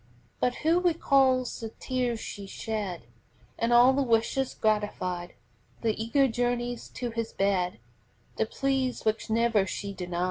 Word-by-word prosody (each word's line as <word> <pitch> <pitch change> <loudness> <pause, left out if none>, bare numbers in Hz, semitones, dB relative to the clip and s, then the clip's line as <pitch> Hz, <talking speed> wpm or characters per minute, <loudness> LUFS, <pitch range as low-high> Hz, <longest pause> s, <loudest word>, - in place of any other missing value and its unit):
But 250 0 +1
who 335 +2 +5
recalls 275 -7 +2
the 225 - -5
tears 250 -3 -1
she 200 -2 -7
shed, 205 -4 -4 0.6
And 230 +1 +1
all 245 +2 +7
the 280 - +1
wishes 250 +2 +1
gratified, 185 -5 -1 0.5
The 225 -1 +2
eager 270 +4 +3
journeys 245 0 -2
to 245 -2 -3
his 230 0 -3
bed, 190 -2 +1 0.6
The 220 - +1
pleas 265 -1 -1
which 220 +1 0
never 225 -3 +2
she 200 +1 -4
denied? 180 -2 -4
230 Hz, 140 wpm, -28 LUFS, 210-255 Hz, 0.6 s, all